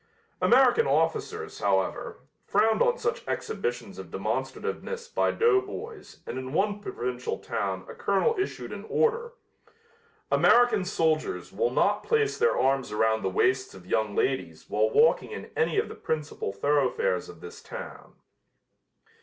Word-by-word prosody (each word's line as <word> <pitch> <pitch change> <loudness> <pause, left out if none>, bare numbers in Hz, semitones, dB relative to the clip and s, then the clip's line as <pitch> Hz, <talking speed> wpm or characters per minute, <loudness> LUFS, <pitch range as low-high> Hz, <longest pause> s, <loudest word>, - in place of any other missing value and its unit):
American 265 - +5
officers, 435 0 -1
however, - - -1 0.2
frowned 220 0 +2
on 485 0 +3
such 470 0 -2
exhibitions 465 +2 -3
of - - -8
demonstrativeness 475 0 -3
by 470 - +1
doughboys 445 0 -1
and 130 - -4
in 130 +1 -6
one 205 +4 +1
provincial 125 -10 -4
town 95 -2 -3
a - - -8
colonel 200 - +1
issued 390 - -3
an - - -7
order: 470 +1 +1 1.0
"American 240 -5 +5
soldiers 160 -4 0
will 475 0 +1
not - - +2
place 440 -2 +1
their 470 +1 +3
arms 135 0 +1
around 110 +1 +2
the 95 - 0
waists 130 +6 +1
of 95 -2 -13
young 105 +2 0
ladies 85 -12 -1
while 110 +1 +1
walking 230 - +4
in 445 - -8
any 460 -2 +1
of 420 - +2
the - - -8
principal 155 -9 -3
thoroughfares 145 - 0
of - - -12
this 445 +1 -10
town." - - -9
225 Hz, 140 wpm, -27 LUFS, -, 1.0 s, American